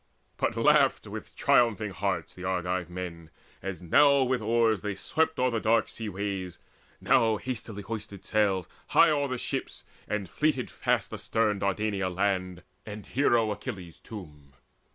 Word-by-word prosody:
But - - -1
laughed - - +4
with - - -8
triumphing 110 -4 +3
hearts 95 -3 -2
the 90 - -10
Argive 90 -1 -1
men, 85 -3 -7 0.3
As 95 -3 -5
now 140 - +5
with 125 -2 0
oars 115 -1 +2
they 105 -1 -3
swept 160 +10 0
o'er 125 -3 +1
dark 110 0 +2
sea 110 -2 -6
ways, 95 -2 -4 0.4
Now 110 -2 +3
hastily 110 -4 -5
hoised 105 0 -5
the 100 - -9
sails 100 -5 +1 0.2
high - - +5
o'er 145 -2 +1
the 130 -1 -3
ships, - - -4 0.2
And 105 -3 -2
fleeted 150 - 0
fast - - 0
astern 110 -3 0
Dardania 100 -1 0
land, 90 -1 -1 0.2
And 105 -1 -8
Hero 120 -5 +2
Achilles' 100 -6 -6
tomb. 75 -10 -11
105 Hz, 150 wpm, -28 LUFS, 95-115 Hz, 0.4 s, now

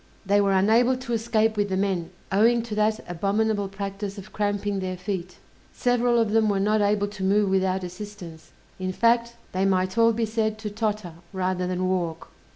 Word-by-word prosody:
They 205 +1 +3
were 200 -1 +2
unable 225 +7 +4
to 245 -2 -5
escape 225 -1 +1
with 205 -1 0
the 190 - 0
men, 190 -4 -1 0.2
owing 230 +4 +4
to 230 -2 -6
that 215 +1 0
abominable 205 +3 0
practice 195 +1 -5
of 200 +2 -10
cramping 205 -1 -1
their 185 -1 -3
feet: 180 -1 -5 0.4
several 245 -1 +2
of 225 -2 +2
them 220 -1 +3
were 200 -1 +1
not 210 +2 +2
able 205 0 +2
to 205 -2 -7
move 200 +1 +2
without 190 0 +1
assistance, 180 -3 -9 0.3
in 185 0 -2
fact, 235 +2 +2 0.2
they 185 +1 0
might 185 +2 +1
all 230 0 +6
be 230 0 0
said 220 0 -1
to 215 -1 -5
totter, 210 -4 -2 0.2
rather 185 -1 -1
than 185 0 -1
walk. 170 -3 -2
205 Hz, 185 wpm, -25 LUFS, 190-220 Hz, 0.4 s, all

